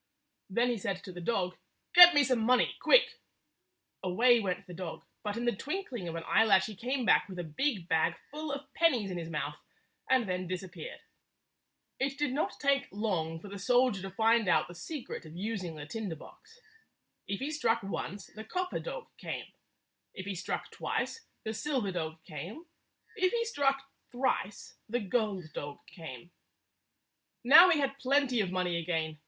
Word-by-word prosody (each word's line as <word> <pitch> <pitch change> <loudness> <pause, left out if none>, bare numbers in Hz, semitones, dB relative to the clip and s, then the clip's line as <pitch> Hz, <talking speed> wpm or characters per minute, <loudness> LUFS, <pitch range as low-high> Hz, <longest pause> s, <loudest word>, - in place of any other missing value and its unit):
Then 235 +5 +2
he 235 - -2
said 190 -1 -3
to 190 - -8
the 175 0 -8
dog, 180 -2 -1 0.4
"Get 355 -1 +11
me 290 - +6
some 255 -2 +2
money, 250 +3 +3
quick! - - +5 0.4
" - - -52
Away 235 +7 +4
went 195 -2 -2
the 180 - -10
dog, 175 -1 -6 0.2
but 210 +1 -3
in 240 - -2
the 240 -3 +2
twinkling 265 - -4
of 165 - -4
an 165 - -4
eyelash 200 -4 +5
he 215 - -7
came 250 +5 -2
back - - +4
with 185 - -7
a 175 - -3
big 180 - -1
bag 160 -2 +2 0.2
full 305 +1 -4
of 280 0 -6
pennies 250 - +2
in 180 - -3
his 165 -1 -6
mouth, 150 -2 -3 0.5
and 255 -4 +3
then 180 0 -2
disappeared. 185 - -6 1.0
It 275 +1 -1
did 290 -2 0
not 295 - -1
take 280 -1 +2
long 180 -6 -2
for 205 - -11
the 200 0 -7
soldier 245 0 +3
to 195 - -5
find 225 +2 +3
out - - +3
the 175 - -10
secret 270 - -6
of 160 0 -11
using 190 -4 -3
the 150 -1 -7
tinder 195 +2 -4
box. 450 - -16 0.7
If 200 0 -2
he 280 +3 -3
struck 240 -8 +1
once, 200 0 -4
the 220 - -10
copper 365 +10 -2
dog - - -6
came; - - -6 0.6
if 190 - -6
he 200 - -3
struck 190 +1 -4
twice, 460 - -3 0.2
the 220 - -3
silver 245 -3 -1
dog 160 -2 -4
came; 180 - -8 0.5
if 370 0 +2
he 465 -1 0
struck 275 -10 0 0.2
thrice, 245 -5 -2
the 240 +3 0
gold 195 -6 -1
dog 145 0 -5
came. 160 -2 -10 1.1
Now 305 +9 +9
he 340 - +4
had 275 -1 -1
plenty 270 -3 +2
of 190 - -1
money 180 -2 0
again. 160 -2 -2
215 Hz, 180 wpm, -31 LUFS, 180-270 Hz, 1.1 s, Get